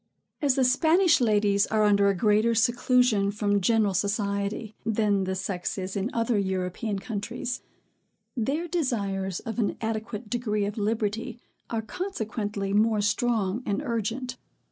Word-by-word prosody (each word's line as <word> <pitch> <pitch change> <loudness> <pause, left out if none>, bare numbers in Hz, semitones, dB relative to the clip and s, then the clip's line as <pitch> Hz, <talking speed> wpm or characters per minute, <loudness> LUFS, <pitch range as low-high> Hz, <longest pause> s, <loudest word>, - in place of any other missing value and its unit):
As 280 -4 +3
the 265 - +3
Spanish 320 +6 +4
ladies 205 -3 +3
are 215 -1 +2
under 200 -1 +4
a 200 - +1
greater 215 +4 +3
seclusion 240 -2 +3
from 205 -1 0
general 215 0 +2
society, 200 +2 -1
than 210 -3 +1
the 190 0 -2
sex 190 -1 -3
is 190 0 -4
in 200 +3 -1
other 230 -2 +1
European 190 +2 -2
countries, 230 +4 -4 0.7
their 275 +8 -1
desires 200 - -1
of 225 +1 -5
an 210 - 0
adequate 220 0 -4
degree 215 -3 -1
of 210 +2 -4
liberty 220 +3 -2 0.3
are 225 -1 -2
consequently 215 - -3
more 215 +1 +3
strong 210 0 0
and 205 -3 -1
urgent. 240 +1 -3
215 Hz, 140 wpm, -27 LUFS, 200-235 Hz, 0.7 s, Spanish